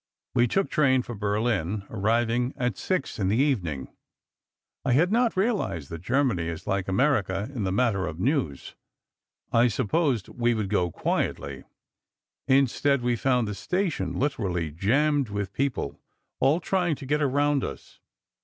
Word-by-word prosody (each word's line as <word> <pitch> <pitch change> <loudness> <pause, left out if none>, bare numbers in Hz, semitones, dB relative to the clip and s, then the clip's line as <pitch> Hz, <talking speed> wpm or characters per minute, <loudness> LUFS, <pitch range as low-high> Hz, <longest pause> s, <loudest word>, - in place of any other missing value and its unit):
We 120 -1 +4
took 195 +9 0
train 130 -4 +3
for 120 - -7
Berlin, 105 -2 -1
arriving 115 +4 0
at 125 0 -1
six 185 -11 -2
in 95 - +1
the 105 +4 +2
evening. 95 - 0 1.0
I 130 - +2
had 170 +8 +3
not 235 -2 +2
realized 190 - -1
that 85 -1 -6
Germany 115 -7 +1
is 80 -1 -5
like 100 -2 -1
America 100 -1 +1
in 115 -7 -2
the 95 - 0
matter 100 -3 +1
of 85 -1 -6
news. 100 - -1 0.8
I 115 +1 +5
supposed 125 - 0
we 120 -1 0
would 105 -3 -2
go 95 -4 +2
in - - -8
quietly. - - -2 0.8
Instead, 135 0 +3
we 120 0 +2
found 125 -1 +1
the 105 - -3
station 145 - -2
literally 90 - -1
jammed 135 - +1
with 100 -1 -3
people, 135 - -2 0.4
all 140 +6 +3
trying 180 -2 0
to 140 - -10
get 150 +3 0
around 145 0 +2
us. - - -7
120 Hz, 155 wpm, -26 LUFS, 100-140 Hz, 1.0 s, I